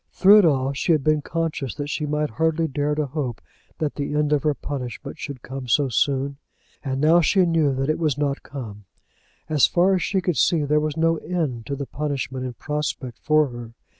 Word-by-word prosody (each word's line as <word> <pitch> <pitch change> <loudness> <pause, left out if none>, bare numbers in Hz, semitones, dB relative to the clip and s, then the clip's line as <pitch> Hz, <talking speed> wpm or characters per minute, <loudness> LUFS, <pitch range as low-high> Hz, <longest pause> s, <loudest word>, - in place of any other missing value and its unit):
Through 200 +3 +7
it 200 - +5
all 135 -3 +2
she 165 +5 +1
had 150 -3 +1
been 155 0 +2
conscious 160 -4 -3
that 145 0 -4
she 150 - -2
might 150 -2 -1
hardly 160 +6 +1
dare 145 +1 -1
to 150 0 0
hope 130 -5 -4 0.4
that 155 -2 -2
the 145 0 -3
end 150 0 +2
of 145 - +2
her 150 0 +1
punishment 125 -6 -6
should 140 -4 -7
come 130 -1 -7
so 140 +3 +2
soon, 140 +2 0 0.5
and 135 -2 -2
now 160 +4 +5
she 185 +2 +3
knew 160 -5 +2
that 135 +1 -1
it 155 +1 0
was 155 -4 0
not 145 -1 0
to - - -23
come. 105 -7 -8 0.6
As 150 -3 +4
far 180 +2 +3
as 185 - +1
she 195 - 0
could 180 -3 -1
see, 165 -4 +3
there 150 +1 +2
was 150 0 -2
no 165 0 +2
end 155 -11 -3
to 140 - -2
the 140 0 -4
punishment 135 -3 -3
in 125 - -6
prospect 145 -3 -4
for 155 -1 +3
her. 120 -1 -9
145 Hz, 220 wpm, -23 LUFS, 135-155 Hz, 0.6 s, Through